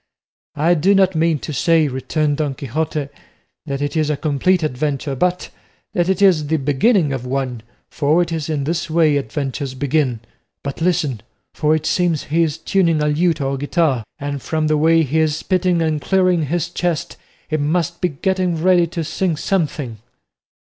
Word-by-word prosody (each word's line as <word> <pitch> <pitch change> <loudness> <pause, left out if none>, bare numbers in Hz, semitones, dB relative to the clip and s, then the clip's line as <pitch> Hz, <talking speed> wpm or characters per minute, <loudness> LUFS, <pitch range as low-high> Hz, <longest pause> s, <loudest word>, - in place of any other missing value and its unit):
"I 160 +4 +3
do 180 +5 +3
not 190 -1 +4
mean 160 -1 +2
to 155 - -5
say," 160 +3 +3
returned 145 +3 -1
Don 145 -3 -1
Quixote, 150 +2 -3 0.6
"that 140 0 -2
it 145 +3 -3
is 155 -1 +1
a 150 - 0
complete 160 +4 +1
adventure, 145 0 -2
but 180 +6 -1 0.4
that 175 0 +1
it 190 +1 +1
is 165 -7 +4
the 160 +2 +1
beginning 145 - +2
of 130 -2 -4
one, 130 -2 -3 0.3
for 150 +3 +2
it 170 - -7
is 160 -2 -3
in 150 -3 -1
this 165 +3 -2
way 155 -2 +3
adventures 135 +1 -4
begin. 135 -4 0 0.4
But 140 +2 -5
listen, 155 - 0 0.3
for 155 +1 +2
it 155 - -3
seems 175 -4 +1
he 160 +3 0
is 160 -2 0
tuning 165 -1 +1
a 150 0 +1
lute 160 +1 +1
or 135 0 -1
guitar, 145 -3 0
and 140 -1 -4
from 155 +3 -1
the 155 0 +2
way 165 +2 +4
he 155 +2 0
is 155 -1 +1
spitting 180 -1 +1
and 155 -2 -1
clearing 185 -3 +2
his 175 +3 -1
chest 175 -2 -2 0.3
he 155 - -1
must 170 +3 -1
be 180 - +2
getting 180 +3 -1
ready 175 0 +4
to 165 0 -4
sing 170 +1 -1
something." 150 - -2
155 Hz, 180 wpm, -19 LUFS, 145-170 Hz, 0.6 s, not